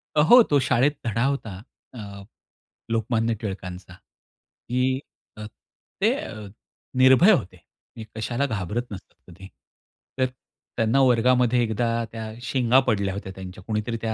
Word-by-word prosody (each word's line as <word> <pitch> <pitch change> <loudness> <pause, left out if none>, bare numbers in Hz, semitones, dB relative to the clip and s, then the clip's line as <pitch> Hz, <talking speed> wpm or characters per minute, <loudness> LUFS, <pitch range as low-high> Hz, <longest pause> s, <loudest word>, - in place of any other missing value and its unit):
अ, - - +3
हो, 240 +12 +8
तो 145 -8 +2
शाळेत 130 +4 +3
धडा 115 +2 0
होता. 110 -9 -3 0.3
अ, 100 -4 -9 0.7
लोकमान्य 115 0 0
टिळकांचा, 90 -3 -7
की 125 +7 -5 0.4
अ, 105 - -7 0.6
ते - - +4
अ, 105 -2 -7 0.5
निर्भय 130 +10 +6
होते, 95 - 0 0.4
ते 110 - -6
कशाला 120 +5 -1
घाबरत 110 -1 -3
नसतात 95 -2 -10 0.2
कधी. 95 +2 -12 0.7
तर 130 - +4 0.5
त्यांना 115 +4 +2
वर्गामध्ये 125 -1 +3
एकदा 115 +1 -1 0.2
त्या 110 -1 -7
शेंगा 125 0 +3
पडल्या 100 -4 0
होत्या 95 -1 -6
त्यांच्या 95 -1 -10
कोणीतरी 110 +2 -3
त्या, 110 -1 -2
115 Hz, 130 wpm, -24 LUFS, 100-125 Hz, 0.7 s, हो